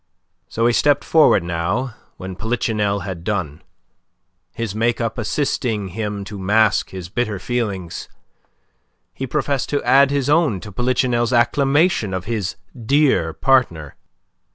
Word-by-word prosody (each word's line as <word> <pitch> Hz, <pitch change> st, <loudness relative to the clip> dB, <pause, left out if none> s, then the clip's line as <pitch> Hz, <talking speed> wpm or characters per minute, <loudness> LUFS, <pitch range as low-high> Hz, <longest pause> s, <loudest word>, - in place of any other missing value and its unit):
So 115 Hz, -, -1 dB
he 120 Hz, -, +3 dB
stepped 145 Hz, +3 st, +3 dB
forward 150 Hz, -, +4 dB
now 90 Hz, +10 st, -2 dB, 0.2 s
when 95 Hz, 0 st, -7 dB
Polichinelle 105 Hz, -2 st, -1 dB
had 90 Hz, -2 st, -6 dB
done. 90 Hz, -6 st, -3 dB, 0.9 s
His 115 Hz, -4 st, -4 dB
make 115 Hz, +2 st, 0 dB
up 115 Hz, 0 st, -2 dB
assisting 115 Hz, -4 st, -1 dB
him 105 Hz, +1 st, -4 dB
to 100 Hz, 0 st, -8 dB
mask 105 Hz, +2 st, +2 dB
his 95 Hz, -2 st, -7 dB
bitter 110 Hz, +1 st, -2 dB
feelings, 100 Hz, -6 st, -4 dB, 1.0 s
he 135 Hz, -, -5 dB
professed 140 Hz, -1 st, -1 dB
to 145 Hz, -, -1 dB
add 140 Hz, +1 st, +5 dB
his 140 Hz, -2 st, 0 dB
own 150 Hz, -, +2 dB
to 105 Hz, -, -9 dB
Polichinelle's 120 Hz, +1 st, 0 dB
acclamations 135 Hz, -, +2 dB
of 95 Hz, 0 st, -4 dB
his 105 Hz, -5 st, -3 dB, 0.2 s
dear 130 Hz, -, +2 dB
partner. 80 Hz, -, +1 dB
110 Hz, 130 wpm, -20 LUFS, 95-130 Hz, 1.0 s, add